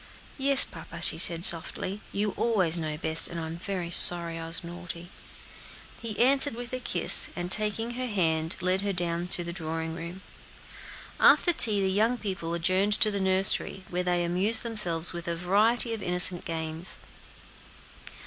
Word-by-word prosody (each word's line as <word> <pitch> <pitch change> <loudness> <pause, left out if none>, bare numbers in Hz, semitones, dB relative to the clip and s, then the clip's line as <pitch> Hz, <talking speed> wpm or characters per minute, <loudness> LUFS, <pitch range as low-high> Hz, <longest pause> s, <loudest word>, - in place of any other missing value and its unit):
"Yes, 275 0 +6
papa," - - -12
she - - +4
said 170 +1 +6
softly; 185 +4 -2
"you 205 +1 -2
always 190 -9 -1
know 155 -3 -5
best, 160 +1 +3
and 170 - -7
I 160 - -6
am 160 +1 -8
very 180 -2 -6
sorry 170 -1 +2
I 165 - -7
was 165 +1 -7
naughty." 175 0 -9 0.9
He 225 -3 -7
answered 270 +1 +2
with 245 +1 -9
a 255 - -3
kiss, - - +5
and, 175 0 -6
taking 215 +3 -1
her 255 +1 -5
hand, 165 -6 -1
led 185 +1 0
her 200 0 -3
down 175 -1 -3
to 175 -1 0
the 170 0 -7
drawing 160 -1 -4
room. 170 +3 -9 1.0
After 350 - +4
tea 215 -10 +5
the - - 0
young 220 +5 0
people 185 -6 -5
adjourned 185 +4 0
to 215 0 +1
the 200 -1 -4
nursery, 190 0 0
where 180 0 -2
they 175 -1 -1
amused 190 +6 +2
themselves 180 -8 0
with 170 0 -8
a 170 - -2
variety 215 +7 0
of 220 - -7
innocent 180 0 +1
games. 160 +1 -6
180 Hz, 170 wpm, -26 LUFS, 170-210 Hz, 1.0 s, Yes